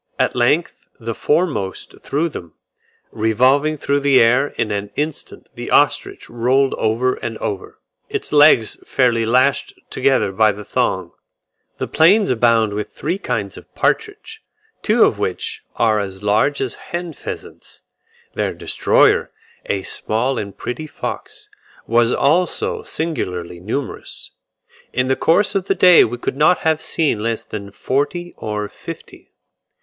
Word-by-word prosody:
At - - +1
length 135 +7 0
the 115 -1 -4
foremost 145 - -1
threw 150 +4 -1
them, 85 - -9 0.6
revolving 130 +8 +2
through 140 0 0
the 140 -2 +4
air: 125 +5 +4
in 115 -6 -3
an 100 0 -3
instant 150 0 -4
the - - -7
ostrich - - +1
rolled 130 +3 +1
over 115 +4 +1
and 115 - -5
over, 100 -2 -5 0.3
its - - -4
legs 145 -7 +5
fairly 115 -4 +1
lashed 130 +4 +1
together - - +1
by 110 +1 +3
the 105 +1 -10
thong. 95 -8 -1 0.7
The - - -2
plains 190 +5 +4
abound 115 -3 +3
with 105 0 -4
three 175 +6 -3
kinds 100 - -3
of - - -14
partridge, - - -2 0.4
two - - +4
of - - +2
which - - -3
are 110 -2 +2
as 95 -1 -6
large 110 +8 +2
as 130 -3 -2 0.2
hen 175 -1 -4
pheasants. - - -9 0.5
Their - - -2
destroyer, - - +2 0.4
a 95 -1 -1
small 120 +8 -1
and 100 -1 -7
pretty 155 +6 -5
fox, - - -7 0.4
was 115 +1 +3
also 185 - +1
singularly 90 - -4
numerous; 115 +9 -5 0.6
in 125 +1 0
the 130 +1 +1
course 195 +9 +2
of 195 -1 -1
the 195 - +2
day 180 -1 +7
we 120 +2 -2
could 125 - -4
not 155 +5 +4
have 160 -1 +1
seen 145 -10 0
less 115 0 -2
than 100 -2 -7
forty 145 - -2
or 105 -1 -4
fifty. - - -11
125 Hz, 145 wpm, -19 LUFS, 110-150 Hz, 0.7 s, day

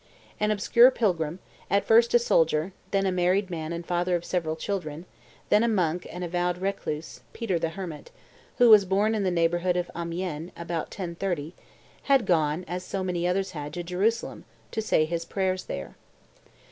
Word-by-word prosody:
An 210 - +1
obscure 235 +4 +5
pilgrim, 175 - 0 0.3
at 200 0 +2
first 230 +2 +5
a - - +10
soldier, 165 -6 +2 0.2
then 195 -1 +1
a 190 - +2
married 185 +2 +1
man 160 -1 -4
and 170 0 -5
father 175 +1 0
of 175 - -3
several 165 -3 -1
children, 165 -2 -4 0.4
then 210 - +5
a - - +3
monk 180 -6 0
and 180 +2 -6
a - - -2
vowed 175 +1 -1
recluse, 180 -5 -4
Peter 195 -8 -1
the 165 0 -1
Hermit, 165 -2 -7 0.5
who 240 -2 +6
was 210 -2 +9
born 200 +4 +1
in 215 - 0
the 190 - +1
neighborhood 175 +1 +1
of 175 0 -2
Amiens, 170 -1 -4
about 170 -1 -3
1030, 170 -3 -4 0.5
had 270 -5 +4
gone, 160 -1 +1
as 180 +2 -4
so 190 +1 -3
many 175 -1 -1
others 190 +1 0
had, 150 -3 -6
to 175 - -3
Jerusalem 200 +7 -1 0.3
"to 220 - -2
say 160 -7 +2
his 165 +1 -3
prayers 185 +1 -2
there." 70 - -6
180 Hz, 180 wpm, -26 LUFS, 170-195 Hz, 0.5 s, a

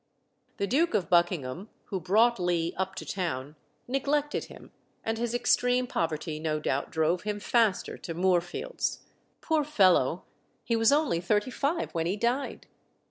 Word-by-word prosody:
The 200 - 0
Duke 290 - +2
of 185 -6 -1
Buckingham, 175 +1 +1 0.2
who 190 - -1
brought 220 +5 +3
Lee 175 -2 0
up 190 0 -3
to - - -6
town, 150 -6 -3 0.3
neglected 285 +3 0
him, - - -14 0.3
and 225 0 -2
his 240 0 -1
extreme 245 +1 +2
poverty 160 -6 -2
no 155 -1 -1
doubt 140 -2 -1
drove 160 +2 +1
him 210 -1 -3
faster 225 -2 +1
to 165 - -6
Moorfields. 180 - 0 0.4
Poor 315 -2 +1
fellow! 185 - +3 0.4
he 230 - 0
was 225 +2 +4
only 290 - +2
thirty 210 +6 +1
five 295 +6 -1
when 165 -1 -1
he 190 +4 -1
died. 240 +5 -1
195 Hz, 150 wpm, -28 LUFS, 170-245 Hz, 0.4 s, was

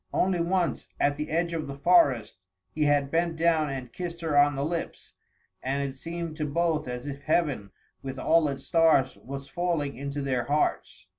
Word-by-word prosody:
Only 185 -1 +2
once, 175 +1 0
at 145 0 +2
the 150 +1 -4
edge 170 +2 0
of 160 -2 -3
the 140 - -6
forest, 140 - +3 0.3
he 155 -1 0
had 145 -1 +2
bent 170 0 +1
down 160 -2 +2
and 130 -3 -6
kissed 170 -2 -5
her 160 -3 -1
on 145 0 +5
the 140 +1 -1
lips, 170 +1 -5 0.5
and 140 +2 -1
it 135 - -7
seemed 165 +2 -5
to 150 - -1
both 160 -1 0
as 125 +1 -5
if 140 -1 -6
heaven 150 -11 0 0.3
with 135 -1 -6
all 160 +4 +3
its 135 -1 -4
stars 160 -5 +3
was 135 +1 -8
falling 170 -5 -1
into 140 +2 -4
their 130 -3 0
hearts. 145 +4 -1
150 Hz, 190 wpm, -27 LUFS, 140-170 Hz, 0.5 s, on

